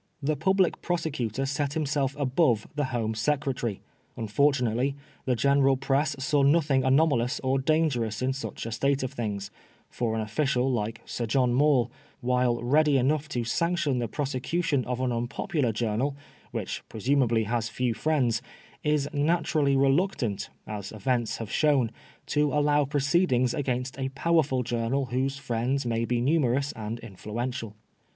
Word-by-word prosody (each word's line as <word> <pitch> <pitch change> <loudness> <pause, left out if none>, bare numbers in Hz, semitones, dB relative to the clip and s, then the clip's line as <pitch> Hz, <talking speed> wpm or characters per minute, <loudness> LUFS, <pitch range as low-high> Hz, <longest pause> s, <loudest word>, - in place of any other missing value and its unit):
The 150 +1 0
Public 190 +4 +2
Prosecutor 140 - -2
set 140 +1 -1
himself 145 -3 0
above 130 -5 +2
the 145 -1 0
Home 115 -4 -2
Secretary. 130 -3 -1 0.4
Unfortunately 125 +2 +1 0.3
the 125 - +2
general 135 +2 +3
press 140 +3 +1
saw 145 +2 +1
nothing 140 -1 +3
anoma 135 +2 +4
lous 120 +3 -1
or 130 +1 +1
dangerous 130 -7 +1
in 130 +1 0
such 135 -3 -6
a 115 - -4
state 135 +4 +1
of 130 - -3
things; 100 -3 -4 0.4
for 115 -2 -1
an 110 - -1
official 125 +4 0
like 115 -1 -2
Sir 120 - -3
John 125 +1 +2
Maule, 130 -3 +3 0.3
while 125 -2 +1
ready 145 +3 +4
enough 145 +4 +1
to 120 -5 -1
sanction 155 +1 0
the 120 - -1
prosecution 140 +3 -1
of 125 0 -3
an 130 -1 0
unpopular 120 +3 -1
journal, 115 +5 -1 0.3
which - - -4
presumably 120 0 +1
has 115 +1 -1
few 125 +1 -1
friends, 130 -4 +1 0.4
is 150 -1 +1
naturally 150 -2 +2
reluctant, 135 - +1 0.2
as 105 -2 -6
events 115 +1 -1
have 115 -2 -6
shown, 140 -7 +2 0.3
to 150 -1 +1
allow 145 0 +3
proceedings 140 -3 +2
against 130 -2 -2
a 135 0 -1
powerful 135 -2 +1
journal 120 +3 -1
whose 135 +2 0
friends 130 0 -1
may 115 -1 0
be 120 0 0
numerous 140 0 +2
and 110 +1 -5
influential. 115 +2 -5
130 Hz, 145 wpm, -27 LUFS, 120-145 Hz, 0.4 s, anoma